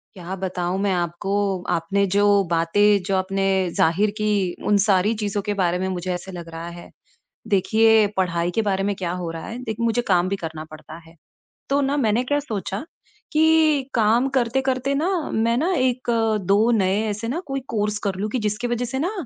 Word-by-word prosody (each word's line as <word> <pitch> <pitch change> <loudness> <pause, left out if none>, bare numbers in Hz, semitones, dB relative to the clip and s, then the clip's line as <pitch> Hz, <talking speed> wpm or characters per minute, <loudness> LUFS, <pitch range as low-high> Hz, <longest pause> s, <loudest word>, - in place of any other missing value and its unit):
क्या 185 +1 -6
बताऊँ 185 -1 -2
मैं 200 -1 +1
आपको, 190 +2 -1
आपने 195 +5 +1
जो 205 -1 +4
बातें 200 +5 +3
जो 195 -1 0
आपने 195 +1 -1 0.3
ज़ाहिर 185 +6 +2
की 205 -4 0
उन 205 - +4
सारी 200 +2 +3
चीज़ों 205 0 -1
के 205 +1 -2
बारे 180 -1 +2
में 190 - -1
मुझे 180 0 -3
ऐसा 180 +2 -6
लग 170 -2 -8
रहा 165 +1 -7
है। - - -12 0.6
देखिए 220 +2 +4
पढ़ाई 175 -1 0
के 225 - +3
बारे 195 -2 0
में 200 0 0
क्या 175 -2 -3
हो 170 - -3
रहा 165 -1 -7
है 235 - -6
देखिए 225 0 -4
मुझे 235 +1 +1
काम 180 -1 +3
भी 200 - 0
करना 160 -3 -6
पड़ता 155 +1 -11
है। 165 - -18 0.5
तो 280 +1 +2
ना 280 +2 0
मैंने 230 -1 +2
क्या 290 +3 0
सोचा 210 -5 -4 0.5
कि 310 -3 +3
काम 230 +3 +3
करते 260 0 +1
करते 265 +1 -1
ना 315 +5 0 0.2
मैं 230 +1 +1
ना 350 +7 +1
1-2 225 -4 +1
नए 200 -1 +2
ऐसे 210 +3 -4
ना 290 +8 -2
कोई 270 0 -2
कोर्स 210 -1 -1
कर 190 - -1
लूँ 210 +3 -3
कि 250 - -2
जिसकी 210 +3 -2
वज़ह 240 +1 -1
से 265 +2 -4
ना 350 +7 -1
205 Hz, 195 wpm, -22 LUFS, 185-235 Hz, 0.6 s, जो